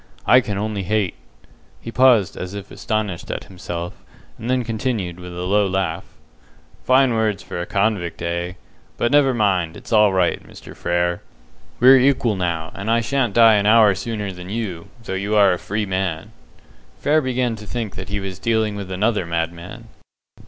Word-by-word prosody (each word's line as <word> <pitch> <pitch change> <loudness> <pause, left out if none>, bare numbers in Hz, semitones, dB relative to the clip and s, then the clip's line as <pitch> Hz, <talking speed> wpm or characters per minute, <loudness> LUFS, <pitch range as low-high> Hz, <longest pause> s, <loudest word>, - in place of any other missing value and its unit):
I 125 - +6
can 105 -4 -4
only 105 0 -2
hate!" 100 0 0 0.7
He 115 - -8
paused 120 -7 +4
as 90 +2 -6
if 100 -1 -8
astonished 105 -5 -3
at - - -4
himself, 90 -2 -7 0.4
and 115 - -5
then 130 -1 +1
continued, 110 -6 -3
with 90 0 -9
a 90 - -3
low 100 +2 +2
laugh. 95 -2 -2 0.8
"Fine 130 -1 +4
words 110 -3 0
for 85 - -5
a 85 - -5
convict, 100 -4 -1
eh! 85 +1 -2 0.4
But, 120 - 0
never 145 -2 +5
mind, 95 -7 +1
it's - - -7
all 105 -2 +5
right, 95 -2 +1
Mr. - - -13
Frere; 85 0 -1 0.6
we're 130 +2 +8
equal 130 -4 +2
now, 85 -3 -2
and 100 +3 -5
I 115 +1 +3
sha'n't 120 -2 -1
die 115 -2 +7
an 100 0 +1
hour 110 -2 +6
sooner 105 0 -4
than 90 0 -10
you, 100 -6 -4 0.2
though 100 - -5
you 100 +3 -1
are 100 -3 +5
a 90 - -4
'free 105 +2 -2
man'!" 95 0 -3 0.7
Frere 155 +2 +2
began 125 -3 -1
to 105 -1 -11
think 115 -3 -4
that 95 0 -8
he 100 0 -2
was 95 -1 -6
dealing 110 -2 0
with 100 -2 -6
another 100 -1 0
madman. 85 +1 -4
100 Hz, 180 wpm, -21 LUFS, 90-115 Hz, 0.8 s, we're